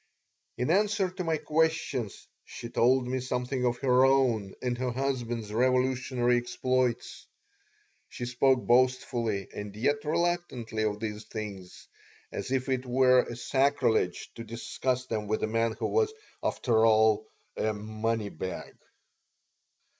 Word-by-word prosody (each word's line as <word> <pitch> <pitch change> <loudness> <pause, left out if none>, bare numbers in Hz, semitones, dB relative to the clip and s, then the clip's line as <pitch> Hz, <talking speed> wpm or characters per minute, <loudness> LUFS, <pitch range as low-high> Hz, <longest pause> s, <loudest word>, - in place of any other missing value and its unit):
In 125 +5 0
answer 200 0 +2
to 185 0 -5
my 165 -2 0
questions 155 -8 -1 0.2
she 120 - -8
told 125 +2 +3
me 130 +1 -1
something 125 0 -1
of 120 0 0
her 125 0 +5
own 125 -7 +2
and 125 -1 -1
her 130 0 0
husband's 120 -4 -2
revolutionary 125 0 +2
exploits. 125 0 -1 0.8
She 120 - -5
spoke 125 +1 +2
boastfully 120 -4 +2
and 105 -1 -7
yet 145 +6 0
reluctantly 155 -9 -1
of 105 -1 -1
these 105 -1 -5
things, 100 -5 -8 0.4
as - - -5
if 130 0 0
it 130 -1 0
were 130 0 +5
a 120 - -7
sacrilege 130 -7 +1
to 115 - -8
discuss 125 +2 -2
them 110 -4 -3
with 110 +1 -1
a - - +2
man 115 +1 +1
who - - -4
was, 440 -1 +2 0.3
after 115 -3 +1
all, 110 -1 +4 0.3
a 110 - 0
"money 110 +1 -2
bag." 95 +1 -6
125 Hz, 135 wpm, -29 LUFS, 110-130 Hz, 0.8 s, her